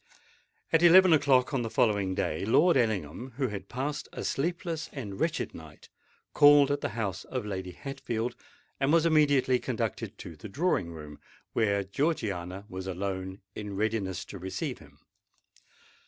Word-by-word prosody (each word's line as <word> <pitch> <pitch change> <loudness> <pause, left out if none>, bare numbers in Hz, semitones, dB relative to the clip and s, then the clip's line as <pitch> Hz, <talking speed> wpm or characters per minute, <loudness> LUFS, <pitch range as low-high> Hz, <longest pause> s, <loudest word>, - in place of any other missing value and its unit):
At 165 - +5
eleven 175 +1 +8
o'clock 140 -3 +3
on 135 - +1
the 115 - -3
following 100 -5 +1
day, 80 - -1
Lord 160 - +4
Ellingham, 110 - -1
who 130 -3 0
had 100 -2 -7
passed 140 +4 -3
a - - -6
sleepless 165 +1 -2
and 105 -9 -7
wretched 165 0 -1
night, 80 -2 -13 0.4
called 145 -1 +7
at 145 0 -1
the 105 - -4
house 100 -4 -2
of 130 -4 -4
Lady 95 -3 -5
Hatfield, 120 -1 -4 0.4
and 135 +1 +2
was 165 0 +4
immediately 145 -5 +4
conducted - - -3
to 80 - -9
the 90 +8 -10
drawing 105 - 0
room, 75 -3 -10 0.3
where 100 -3 +1
Georgiana 100 - -2
was 95 -1 -6
alone 95 0 -4
in 105 -2 -6
readiness 100 -3 -1
to 100 - -9
receive 95 +2 -4
him. - - -17
110 Hz, 155 wpm, -29 LUFS, 95-145 Hz, 0.4 s, eleven